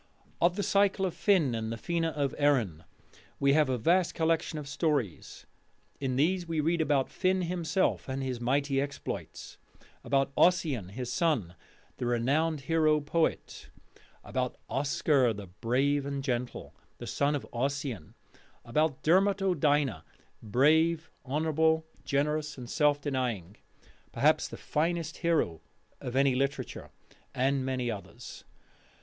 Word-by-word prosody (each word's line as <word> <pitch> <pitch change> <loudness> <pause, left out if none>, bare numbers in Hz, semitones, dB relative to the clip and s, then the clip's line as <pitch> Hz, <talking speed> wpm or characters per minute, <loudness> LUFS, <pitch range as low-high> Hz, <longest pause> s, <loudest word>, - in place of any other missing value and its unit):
Of 175 +1 +4
the 205 - -1
Cycle 200 -1 +2
of 180 - -2
Finn 175 - +2
and 110 -1 -3
the - - -2
Fena 165 +5 -1
of 140 -3 -1
Erin 115 - +1 0.5
we 140 0 +4
have 150 -2 +3
a 130 - +1
vast 170 +9 +2
collection 160 -1 0
of 150 -2 -6
stories. 145 - -2 0.5
In 130 -2 -1
these 175 +6 +1
we 165 -1 -1
read 165 +2 +1
about 145 -4 +2
Finn 185 0 +1
himself 175 -2 0
and 135 +1 -3
his 125 -2 -3
mighty 135 +2 +1
exploits; 145 0 -6 0.4
about 135 0 +1
Ossian 150 - +2
his 120 +4 -5
son, 125 - 0 0.4
the 125 - -2
renowned 140 +6 +1
hero 155 +1 +2
poet; 160 +3 -2 0.5
about 125 -1 -3
Oscar 140 -3 +2
the 100 -1 -8
brave 125 +9 0
and 140 0 -4
gentle, 125 -2 -3 0.2
the - - -8
son 145 +1 0
of 145 - -4
Ossian; 130 - -3 0.5
about 150 +3 0
Dermot 195 +5 +4
O'Dyna, 145 - +1 0.4
brave, 155 +9 +2 0.2
honourable, 160 +2 +1 0.2
generous, 150 +1 -1
and 125 -2 -8
self 150 +2 +2
denying, 125 - -2 0.6
perhaps - - +2
the - - -9
finest 165 +1 -1
hero 160 - 0 0.4
of 125 - -6
any 135 0 +4
literature; 135 +2 -2 0.5
and 135 +1 +1
many 130 -2 -1
others. 100 -3 -9
145 Hz, 135 wpm, -29 LUFS, 125-160 Hz, 0.6 s, Of